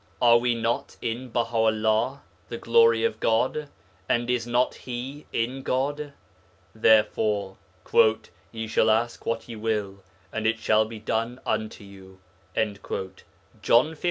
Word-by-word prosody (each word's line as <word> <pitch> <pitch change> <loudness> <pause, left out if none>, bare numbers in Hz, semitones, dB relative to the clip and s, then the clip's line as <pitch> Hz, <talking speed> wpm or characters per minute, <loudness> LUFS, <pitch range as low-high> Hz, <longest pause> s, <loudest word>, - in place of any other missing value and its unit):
Are 120 -1 +6
we 120 0 +1
not 115 +1 -2
in 120 +2 -4
Baha'ullah 115 +2 +1 0.3
('the - - -5
Glory 465 0 +4
of 460 - 0
God'), 130 +6 0 0.4
and 120 +1 +1
is 120 -1 -1
not 120 +1 +1
He 130 +4 -7
in 125 +4 -2
God? 140 +3 -2 0.6
Therefore, 105 -3 +2 0.9
'ye 110 0 -5
shall 110 0 +2
ask 115 +2 0
what 115 0 -2
ye 120 - -7
will, 105 -3 -2 0.3
and 110 0 -1
it 110 0 +1
shall 110 0 +3
be 110 0 -8
done 115 +3 -2
unto 110 -1 -2
you' 95 -1 -14 1.4
(John 130 +7 +4
xv. - - -14
115 Hz, 130 wpm, -25 LUFS, 110-125 Hz, 1.4 s, Are